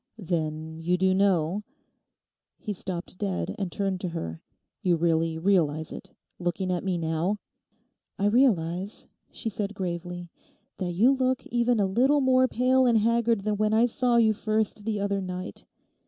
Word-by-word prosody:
'Then 160 -4 -3
you 175 +2 +1
do 190 +1 +3
know—?' 190 -1 +2 1.0
He 210 - -4
stopped 185 -1 -6
dead, 90 -4 -2
and 190 -3 -2
turned 195 -1 -2
to 180 - -2
her. 85 - -5 0.4
'You 180 -2 +3
really 165 -1 +1
realise 160 -4 +1
it, - - -9 0.3
looking 180 +1 -1
at 175 -2 -1
me 185 -2 0
now?' 165 +5 -1 0.8
'I 200 - 0
realise,' 200 -5 +1 0.2
she - - -6
said 205 -1 -3
gravely, 175 -1 -5 0.5
'that 180 -2 -2
you 225 +9 +5
look 260 -1 0
even 240 -1 +1
a 200 - +3
little 255 +10 +3
more 260 -1 +4
pale 255 +1 +3
and 235 -2 +4
haggard 230 0 +2
than 210 +1 -1
when 215 +1 +1
I 230 +2 +5
saw 245 0 +1
you 220 -2 +5
first 215 -1 -1
the 215 -2 -1
other 200 0 -1
night. 185 0 -6
195 Hz, 160 wpm, -27 LUFS, 170-220 Hz, 1.0 s, you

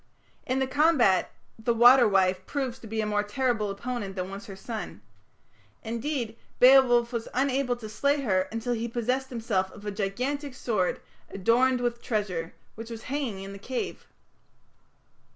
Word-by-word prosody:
In 255 - 0
the 265 - +2
combat 265 - +3 0.3
the 230 +1 0
"water 240 +1 +7
wife" 190 -2 +2
proves 265 -3 -3
to 225 - -11
be 220 +1 -2
a - - -1
more 210 -1 +1
terrible 215 0 -1
opponent 200 -1 -4
than 185 0 -4
was 200 +1 -8
her 195 - -8
son. 210 - -7 0.8
Indeed, 235 0 -3 0.2
Beowulf 250 -2 +6
was 230 -1 -3
unable 265 -1 +1
to 235 -2 -9
slay 280 +6 0
her 190 -7 +1
until 230 +2 -2
he 235 0 -2
possessed 250 +3 -1
himself 220 -6 -1
of 205 - -13
a 205 - -2
gigantic 250 +8 -3
sword, 210 -8 -1 0.3
"adorned 245 +6 +2
with 240 -1 -1
treasure", 185 -7 -2 0.2
which 225 +1 -9
was 225 -1 -7
hanging 255 -8 -3
in 195 0 -8
the 200 - -9
cave. 250 +5 -5
230 Hz, 160 wpm, -27 LUFS, 205-255 Hz, 0.8 s, water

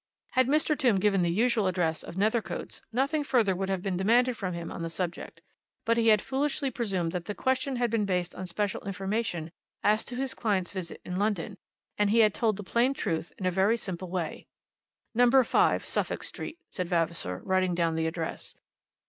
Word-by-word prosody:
Had 255 -1 +3
Mr. 305 +2 +3
Tombe 245 -9 +3
given 195 -1 +3
the 175 - +2
usual 220 +2 +2
address 175 -3 0
of - - -9
Nethercoats, 215 +4 -1
nothing 275 +6 +1
further 230 -9 +2
would 190 +1 -2
have 190 -2 -1
been 190 -3 -1
demanded 240 +6 +3
from 185 -5 -3
him 170 -1 -5
on - - -6
that 165 - -2
subject. 175 +1 -5 0.4
But 230 - +3
he 230 -1 +3
had 215 -2 +5
foolishly 275 0 -1
presumed 195 -9 -1
that 175 -1 -4
the 210 - -4
question 260 +1 0
had 240 -2 0
been 225 -3 +1
based 180 -2 -1
on 185 - -6
special 200 +2 -2
information 195 -4 -2 0.3
as 215 +1 +3
to 245 - -6
his 265 +1 -2
client's 195 -6 0
visit 185 -4 -6
to - - -6
London, 200 0 -1 0.4
and 205 -1 +3
he 230 +2 +5
had 215 -2 +5
told 220 -4 +1
the 205 - -6
plain 240 +7 +2
truth 165 -6 -2
in 190 - -5
a 185 - +3
very 195 +5 +3
simple 185 -4 -6
way. 175 -3 -4 0.7
"Number 245 +2 +5
5, - - +2
Suffolk - - -1
Street," 335 - -6
said 180 -2 -4
Vavasor, 165 - -1
writing 185 -1 +2
down 170 -1 +1
the 160 0 0
address. 160 0 -4
200 Hz, 200 wpm, -29 LUFS, 180-235 Hz, 0.7 s, had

